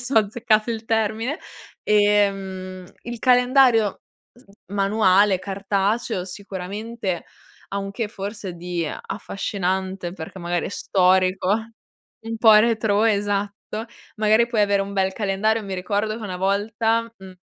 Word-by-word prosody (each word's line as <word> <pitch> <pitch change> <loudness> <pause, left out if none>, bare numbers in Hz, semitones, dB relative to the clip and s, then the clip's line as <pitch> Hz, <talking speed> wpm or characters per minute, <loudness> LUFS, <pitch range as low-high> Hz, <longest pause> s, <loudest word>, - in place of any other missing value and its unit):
se 265 - -5
ho 225 - +7
azzeccato 215 +1 +1
il 225 0 -4
termine, 225 +5 -1 0.5
ehm, 195 -3 +1 0.2
il 240 0 -6
calendario 250 -3 +4 0.3
sn 240 -5 -21 0.2
manuale, 200 -1 +3
cartaceo 200 +1 -1
sicuramente 200 +1 -5 0.4
ha 200 - -3
un 195 0 -4
che 210 +1 -3
forse 200 -2 -6
di 175 -1 -3
affascinante, 190 0 -3
perché 175 +1 -8
magari 175 -1 -2
è - - -4
storico 185 -1 +2 0.8
un 225 0 -3
po' 220 0 +6
retrò, 220 -1 +3
esatto, 205 +2 -2 0.3
magari 220 +2 +4
puoi 235 -3 0
avere 200 -1 +3
un 200 - -6
bel 190 -1 +1
calendario. 215 +2 0
Mi 195 -1 -5
ricordo 205 +3 -1
che - - -10
una 185 -3 -4
volta, 225 +4 0
mhmm 190 -1 -13
205 Hz, 130 wpm, -23 LUFS, 190-220 Hz, 0.8 s, ho